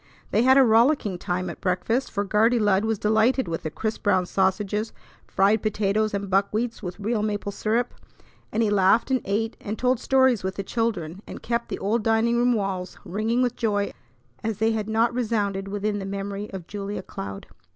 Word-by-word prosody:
They - - +3
had 260 +2 +6
a 270 - +8
rollicking 225 -4 +3
time 180 0 -2
at - - -7
breakfast, 225 +8 0
for 200 - -1
Guardy 220 +4 +3
Lud 205 -2 +2
was 220 -1 0
delighted 220 +4 +2
with 165 -1 -3
the 155 - -3
crisp 220 +7 -4
brown 185 -3 +2
sausages, 200 +4 0 0.3
fried 200 +2 +3
potatoes, 215 0 0
and 200 0 -3
buckwheats 205 +5 0
with 180 +1 -6
real 215 +1 -1
maple 205 -1 -2
syrup; 225 +4 -1 0.6
and 230 - +1
he 210 - +1
laughed, 205 +5 +3
and 260 - +2
ate, 220 +3 -1
and 210 +1 -4
told 250 -1 +1
stories 260 -5 +3
with 190 0 -3
the 195 - -3
children, 195 -6 -2
and - - -9
kept 235 0 -2
the - - -3
old 215 +4 0
dining 225 +1 +2
room 245 +1 +3
walls 195 -4 -3
ringing 220 +6 0
with 245 -1 0
joy 205 -3 0 0.5
as 220 -2 -2
they 220 +1 +2
had 220 -1 -2
not 225 +2 +2
resounded 205 -5 -1
within 205 +1 -2
the 195 - -5
memory 200 +1 -4
of 190 -4 -7
Julia 200 +1 -5
Cloud. 100 - -7
210 Hz, 195 wpm, -25 LUFS, 195-230 Hz, 0.6 s, a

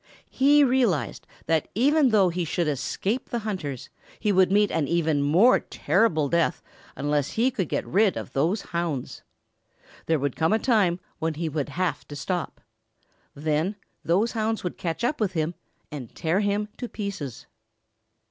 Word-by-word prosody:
He 285 +2 +5
realized 245 - +1 0.2
that 160 -1 +1
even 280 +4 +4
though 200 -5 +4
he 175 +1 -2
should 170 +1 -1
escape 190 - -2
the 240 - -1
hunters 150 - -4 0.3
he 210 - +1
would 185 -1 +4
meet 205 0 +3
an 155 -4 0
even 160 -4 +1
more 180 - +5
terrible 170 -8 +1
death 170 -1 +1 0.3
unless 145 -1 -1
he 245 +4 +2
could 190 - -2
get - - -1
rid 200 +1 +2
of - - -7
those 170 +10 +1
hounds. 170 -7 -3 0.9
There 160 - +3
would 140 -2 -2
come 160 +5 +2
a - - +4
time 210 -8 +2 0.2
when 160 -1 -1
he 160 +1 -2
would 150 -1 -3
have 170 -1 -2
to 145 - -8
stop. 170 +5 -3 0.7
Then 155 +6 0 0.3
those 195 +8 +2
hounds 220 -1 -1
would 180 - -3
catch 165 +5 -4
up 245 +2 0
with 195 -3 0
him 160 0 -1 0.4
and 135 -6 -8
tear 165 +4 0
him 205 0 0
to 245 - -5
pieces. 195 - -5
175 Hz, 165 wpm, -25 LUFS, 155-215 Hz, 0.9 s, He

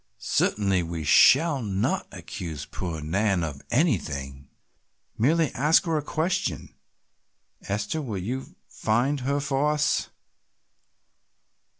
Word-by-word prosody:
Certainly 100 -3 +1
we 85 -1 -4
shall 140 - +5
not 100 -3 -1
accuse 80 -5 -7
poor 85 -2 -5
Nan 95 +3 0
of 70 -4 -5
anything, 70 - -1 0.7
merely 155 +5 +2
ask 150 +7 +3
her 165 -2 0
a 150 - +1
question. 160 +4 -2 0.9
Esther, 105 +10 -2
will 115 -8 -4
you 125 +9 -5
find 125 +6 0
her 140 +3 -1
for 140 +1 +1
us?" 150 0 0
110 Hz, 105 wpm, -26 LUFS, -, 0.9 s, shall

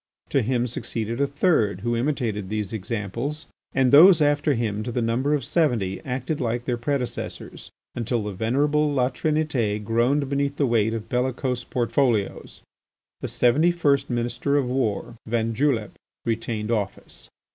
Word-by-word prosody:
To 135 - +2
him 120 +1 0
succeeded 115 0 -3
a 140 - +3
third, 140 - +1
who 120 +2 0
imitated 115 -6 -1
these 105 -1 -3
examples, 115 - -4 0.3
and 130 -2 +2
those 170 +4 +8
after 145 -1 +2
him 110 -3 -1
to 120 - -4
the 125 - -1
number 125 +6 +1
of 140 - -2
seventy 120 - 0
acted 130 +4 -3
like 120 0 -2
their 125 - 0
predecessors, 125 +1 -4 0.2
until 115 -1 -1
the 105 - -4
venerable 145 +9 +1
La 130 -2 +1
Trinité 145 -8 0
groaned 120 +6 +1
beneath 140 +1 -1
the 145 - +1
weight 115 -2 +2
of 110 -1 -6
bellicose 125 -1 -1
portfolios. 120 -3 -1 0.6
The - - -4
seventy 140 +8 +3
first 145 -5 +1
Minister 120 +4 0
of 135 -3 +1
War, 120 -2 -2
van 115 0 0
Julep, 115 -5 0 0.3
retained 115 -1 -2
office. 105 -4 -4
120 Hz, 150 wpm, -24 LUFS, 115-140 Hz, 0.6 s, those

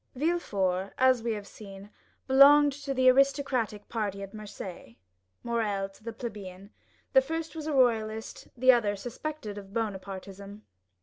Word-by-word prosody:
Villefort, 200 - -1
as 260 -2 +4
we 230 0 -1
have 205 -2 -6
seen, 200 -1 -12 0.3
belonged 285 +2 +7
to 280 0 -6
the 260 -1 +2
aristocratic 255 -5 +2
party 205 -3 -3
at 195 - -9
Marseilles, 200 - -9 0.5
Morrel 210 -5 -1
to 195 +2 -21
the 230 - -5
plebeian; 200 -4 -8 0.4
the 265 - +7
first 325 +4 -5
was 310 -1 -5
a 310 - -1
royalist, 225 -4 0
the 255 +2 +7
other 215 -5 +1
suspected 230 0 -6
of 195 +1 -14
Bonapartism. 200 -1 -5
220 Hz, 140 wpm, -28 LUFS, 200-265 Hz, 0.5 s, belonged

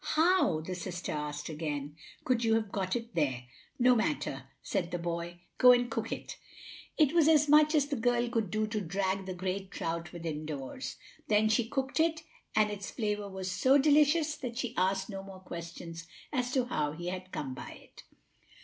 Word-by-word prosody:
"How," 315 - +4
the 180 +3 -5
sister 180 0 -4
asked 150 0 -4
again, 150 -2 -4 0.3
"could 245 -2 +2
you 225 -1 +4
have 215 -3 -1
got 190 0 -1
it 235 0 -4
there?" 130 -6 0 0.3
"No 250 +1 +5
matter," 140 - -1 0.2
said 180 -4 -1
the 175 - -2
boy; 170 0 -4 0.2
"go 250 -1 +9
and 245 -1 +1
cook 225 0 -2
it." - - -5 0.6
It 305 -2 +4
was 330 -3 +5
as 305 -2 +5
much 305 +1 +6
as 290 -2 +4
the 285 0 -2
girl 240 0 +1
could 225 -4 -1
do 215 +4 0
to 215 -1 -2
drag 190 +1 -1
the 185 - -4
great 190 +1 -3
trout 170 -2 -4
within 160 -3 -4
doors. 145 - -5 0.3
Then 215 -3 +4
she 225 +1 +2
cooked 270 +2 -1
it, 320 0 +2 0.3
and 215 -1 +4
its 205 -1 -5
flavor 210 -3 -2
was 190 -1 -4
so 260 +8 +4
delicious 300 +2 +4
that 240 -3 -5
she 245 -2 -2
asked 190 +1 +1
no 195 -2 -6
more 195 -1 -10
questions 170 -1 -8 0.3
as 250 -2 0
to 255 -3 +2
how 150 -11 -1
he 175 +3 -5
had 185 0 -6
come 135 -3 -4
by - - -8
it. - - -14
195 Hz, 195 wpm, -31 LUFS, 170-245 Hz, 0.6 s, go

